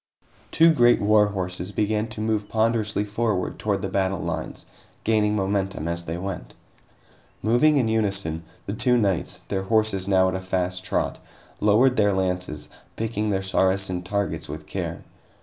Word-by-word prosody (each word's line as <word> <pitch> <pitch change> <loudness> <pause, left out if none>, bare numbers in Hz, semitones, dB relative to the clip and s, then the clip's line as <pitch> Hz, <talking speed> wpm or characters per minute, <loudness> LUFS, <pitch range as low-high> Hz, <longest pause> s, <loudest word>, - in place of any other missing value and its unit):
Two 165 +1 +5
great 120 -4 +5
war 105 0 +4
horses 90 -2 -3
began 105 +1 0
to 110 -1 -6
move 110 -1 -1
ponderously 110 -2 +1
forward 105 -2 -1
toward 100 -2 -1
the - - 0
battle 95 0 0
lines, - - -5 0.4
gaining 105 -1 +2
momentum 95 -4 -1
as 85 0 -3
they 85 +1 -3
went. 95 +2 -6 0.9
Moving 120 +7 +4
in 125 -4 +2
unison, 100 -7 0 0.2
the 100 - -3
two 125 +2 +2
knights, 100 -6 -1
their 95 -1 -1
horses 100 -1 +1
now 95 -1 +4
at 95 - -1
a 95 - -3
fast 90 0 -2
trot, 95 - -1 0.4
lowered 120 +5 +4
their 105 -2 +3
lances, 90 -5 -2 0.3
picking 110 -1 -2
their 95 -1 0
Saracen 95 -1 +1
targets 90 -4 -2
with 75 +1 -7
care. - - -5
100 Hz, 155 wpm, -24 LUFS, 95-110 Hz, 0.9 s, Two